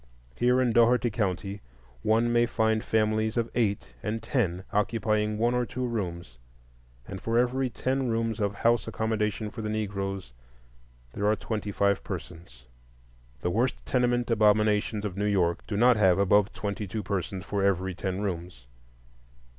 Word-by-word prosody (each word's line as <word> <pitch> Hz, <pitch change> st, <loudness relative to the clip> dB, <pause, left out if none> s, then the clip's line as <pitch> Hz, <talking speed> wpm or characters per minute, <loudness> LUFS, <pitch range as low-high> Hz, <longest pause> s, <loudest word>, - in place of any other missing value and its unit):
Here 125 Hz, +1 st, +3 dB
in 125 Hz, -2 st, +2 dB
Dougherty 120 Hz, +1 st, +4 dB
County 100 Hz, -1 st, -2 dB, 0.4 s
one 115 Hz, -, +2 dB
may 120 Hz, 0 st, +4 dB
find 110 Hz, -1 st, +1 dB
families 110 Hz, +1 st, +1 dB
of 115 Hz, -1 st, 0 dB
eight 105 Hz, -4 st, -1 dB
and 110 Hz, +1 st, -3 dB
ten 95 Hz, -9 st, -1 dB
occupying 105 Hz, 0 st, 0 dB
one 120 Hz, +2 st, +2 dB
or 125 Hz, 0 st, +1 dB
two 125 Hz, +1 st, -4 dB
rooms, 85 Hz, -, -4 dB, 0.7 s
and 95 Hz, -, -7 dB
for 115 Hz, +1 st, 0 dB
every 125 Hz, +2 st, +1 dB
ten 130 Hz, +2 st, -1 dB
rooms 115 Hz, -1 st, -1 dB
of 100 Hz, -1 st, -1 dB
house 115 Hz, 0 st, +2 dB
accommodation 110 Hz, -1 st, -1 dB
for 115 Hz, -, -7 dB
the 110 Hz, -, -3 dB
Negroes 100 Hz, -, -3 dB, 0.8 s
there 100 Hz, -, -1 dB
are 105 Hz, -, +4 dB
twenty 105 Hz, -1 st, -4 dB
five 100 Hz, 0 st, +1 dB
persons. 60 Hz, -8 st, -8 dB, 0.8 s
The -, -, -1 dB
worst -, -, 0 dB
tenement 120 Hz, -, +1 dB
abominations 105 Hz, -1 st, +2 dB
of 100 Hz, -2 st, -4 dB
New 105 Hz, -, 0 dB
York 90 Hz, -4 st, +1 dB
do 105 Hz, -, -2 dB
not 120 Hz, +1 st, +5 dB
have 95 Hz, -4 st, +4 dB
above 100 Hz, +1 st, +3 dB
twenty 100 Hz, 0 st, -4 dB
two 105 Hz, +3 st, -4 dB
persons 95 Hz, 0 st, -3 dB
for 100 Hz, -1 st, -1 dB
every 95 Hz, -1 st, +1 dB
ten 95 Hz, +1 st, -3 dB
rooms. 90 Hz, -9 st, -5 dB
105 Hz, 155 wpm, -27 LUFS, 100-115 Hz, 0.8 s, not